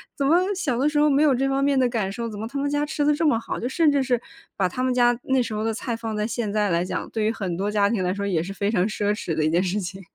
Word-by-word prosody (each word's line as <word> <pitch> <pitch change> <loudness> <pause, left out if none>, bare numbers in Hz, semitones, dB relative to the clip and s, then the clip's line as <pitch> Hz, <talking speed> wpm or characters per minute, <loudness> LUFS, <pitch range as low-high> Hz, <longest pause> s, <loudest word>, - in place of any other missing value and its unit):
怎 280 - -1
么 315 - +5 0.2
小 290 -10 -1
的 290 +3 +3
时 300 - -2
候 300 - +5
没 280 +1 +3
有 290 - +4
这 270 +2 0
方 270 0 +1
面 275 -1 +2
的 255 - +3
感 215 -5 -1
受？ 230 +4 -4
怎 205 -1 -8
么 220 - -4
他 280 - -6
们 285 - 0
家 290 0 0
吃 295 -1 -1
得 300 - +4
这 325 - 0
么 230 -6 +3
好？ - - -5
就 245 - -3
甚 310 +2 +3
至 280 -1 +2
是， 245 -2 +1 0.4
把 190 -2 +2
他 255 - -4
们 255 - +1
家 245 -1 +4
那 265 -1 +2
时 225 - -5
候 215 - -2
的 225 - 0
菜 235 +1 -3
放 225 -1 -5
在 210 - 0
现 225 -2 -3
在 210 -1 +1
来 170 +1 +1
讲， - - -4
对 220 -2 -1
于 220 - +2
很 190 -6 -3
多 200 +2 -1
家 205 -1 +3
庭 205 -6 0
来 180 - 0
说 200 0 -3
也 175 -5 +1
是 195 - -6
非 200 +1 -1
常 195 -2 +2
奢 205 -1 -1
侈 210 -5 -3
的 155 - 0
一 - - +2
件 175 - +3
事 190 +3 -1
情。 190 +2 -6
225 Hz, 365 characters per minute, -24 LUFS, 200-270 Hz, 0.4 s, 么